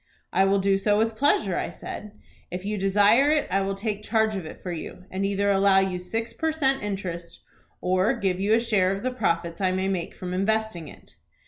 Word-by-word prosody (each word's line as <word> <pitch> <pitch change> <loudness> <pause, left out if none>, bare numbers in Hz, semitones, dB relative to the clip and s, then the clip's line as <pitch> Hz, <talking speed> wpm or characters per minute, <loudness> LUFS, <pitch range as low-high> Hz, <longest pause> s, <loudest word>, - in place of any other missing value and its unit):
"'I 190 - +4
will 195 +1 +3
do 195 0 +2
so 205 +1 +2
with 225 +1 +1
pleasure,' 220 -8 +2
I - - -3
said. 205 +4 -8 0.4
'If 180 +2 -6
you 210 +1 -1
desire 205 +7 +4
it 305 0 +2
I 195 +1 +2
will 195 0 -1
take 205 0 -3
charge 220 0 +1
of 185 -5 -5
it - - -10
for 180 - -4
you, 175 +2 -7
and 190 +1 -2
either 200 0 +1
allow 195 0 +4
you 190 -2 +1
six 225 +6 -3
per 320 0 -1
cent, 270 -4 +1
interest, 180 -4 -5 0.4
or 185 +7 +2
give 190 -5 -1
you 205 +3 +3
a - - +3
share 210 -6 +2
of 195 +1 -4
the 255 - 0
profits 170 -6 -1
I 185 -1 +2
may 190 +1 -1
make 185 -3 -3
from 180 -1 -5
investing 195 -3 -1
it.'" - - -15
195 Hz, 220 wpm, -25 LUFS, 185-220 Hz, 0.4 s, I